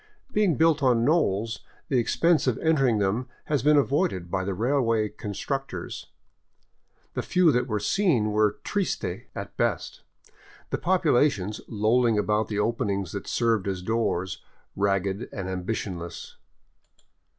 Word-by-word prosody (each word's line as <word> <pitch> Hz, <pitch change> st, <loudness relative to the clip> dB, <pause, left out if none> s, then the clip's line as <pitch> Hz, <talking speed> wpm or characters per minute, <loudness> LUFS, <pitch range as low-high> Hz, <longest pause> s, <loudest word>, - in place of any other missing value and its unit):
Being 205 Hz, -, +2 dB
built 160 Hz, -2 st, +3 dB
on 120 Hz, -3 st, +3 dB
knolls, 115 Hz, -, +1 dB, 0.3 s
the 130 Hz, -, +2 dB
expense 165 Hz, +6 st, +2 dB
of 125 Hz, -, +2 dB
entering 135 Hz, -8 st, +2 dB
them 105 Hz, +5 st, 0 dB, 0.2 s
has 145 Hz, -3 st, 0 dB
been 150 Hz, +1 st, +5 dB
avoided 95 Hz, -11 st, 0 dB
by 95 Hz, -1 st, 0 dB
the 95 Hz, 0 st, -2 dB
railway 115 Hz, -1 st, +1 dB
constructors. 105 Hz, 0 st, -5 dB, 1.1 s
The -, -, -2 dB
few 180 Hz, -3 st, +3 dB
that 125 Hz, -1 st, +1 dB
were 105 Hz, -3 st, -1 dB
seen 135 Hz, -, +1 dB
were 105 Hz, -1 st, +2 dB
triste 200 Hz, -, -1 dB, 0.3 s
at -, -, -7 dB
best, -, -, -1 dB, 0.7 s
the -, -, -1 dB
populations, 145 Hz, -, +2 dB
lolling 115 Hz, +1 st, +2 dB
about 105 Hz, +1 st, +1 dB
the 105 Hz, -, -3 dB
openings 105 Hz, -4 st, -1 dB
that 100 Hz, -, -6 dB
serve 115 Hz, -4 st, +1 dB
as 95 Hz, -2 st, -3 dB
doors, 95 Hz, -4 st, -1 dB, 0.3 s
ragged 100 Hz, +1 st, 0 dB
and 95 Hz, -2 st, -5 dB
ambitionless. 90 Hz, -2 st, -5 dB
110 Hz, 130 wpm, -26 LUFS, 100-140 Hz, 1.1 s, been